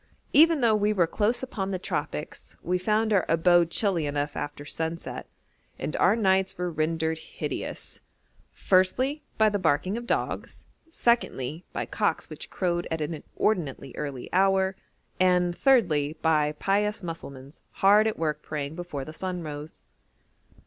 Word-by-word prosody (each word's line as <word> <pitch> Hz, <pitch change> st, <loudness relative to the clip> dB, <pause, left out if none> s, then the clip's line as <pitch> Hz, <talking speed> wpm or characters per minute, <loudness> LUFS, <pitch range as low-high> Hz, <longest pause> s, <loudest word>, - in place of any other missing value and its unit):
Even 320 Hz, 0 st, +6 dB
though 230 Hz, -2 st, +4 dB
we 210 Hz, 0 st, +2 dB
were 185 Hz, -5 st, +3 dB
close 215 Hz, +9 st, 0 dB
upon 200 Hz, -7 st, -3 dB
the 190 Hz, -, -1 dB
tropics 180 Hz, -, -5 dB
we 180 Hz, +1 st, 0 dB
found 215 Hz, +3 st, +1 dB
our 195 Hz, -, +4 dB
abode 170 Hz, +1 st, +4 dB
chilly 175 Hz, -5 st, +1 dB
enough 145 Hz, 0 st, -2 dB
after 145 Hz, 0 st, -5 dB
sunset; 160 Hz, +2 st, -4 dB, 0.5 s
and 150 Hz, -, -4 dB
our 195 Hz, -, +4 dB
nights 190 Hz, -3 st, +2 dB
were 180 Hz, 0 st, -2 dB
rendered 160 Hz, 0 st, -1 dB
hideous -, -, -5 dB, 0.5 s
firstly, 255 Hz, +11 st, +2 dB, 0.2 s
by 220 Hz, -, +5 dB
the 205 Hz, -1 st, +1 dB
barking 185 Hz, +5 st, +1 dB
of 240 Hz, 0 st, -7 dB
dogs; -, -, -2 dB, 0.3 s
secondly, 180 Hz, -, 0 dB
by -, -, -3 dB
cocks -, -, -1 dB
which -, -, -8 dB
crowed 175 Hz, -2 st, -1 dB
at 160 Hz, -, -2 dB
an 155 Hz, +2 st, -2 dB
inordinately 150 Hz, -4 st, -2 dB
early 140 Hz, -4 st, -5 dB
hour; 190 Hz, 0 st, +3 dB, 0.4 s
and, 180 Hz, -1 st, +3 dB
thirdly, 160 Hz, -, +3 dB
by 150 Hz, -2 st, +3 dB
pious 205 Hz, +5 st, 0 dB
Mussulmans 140 Hz, -4 st, -8 dB
hard 205 Hz, +3 st, +5 dB
at 220 Hz, -, -2 dB
work 150 Hz, -2 st, -1 dB
praying 145 Hz, -1 st, -4 dB
before 160 Hz, -5 st, -5 dB
the 155 Hz, -, -9 dB
sun 180 Hz, +1 st, -4 dB
rose. 150 Hz, 0 st, -8 dB
175 Hz, 150 wpm, -27 LUFS, 155-205 Hz, 0.5 s, Even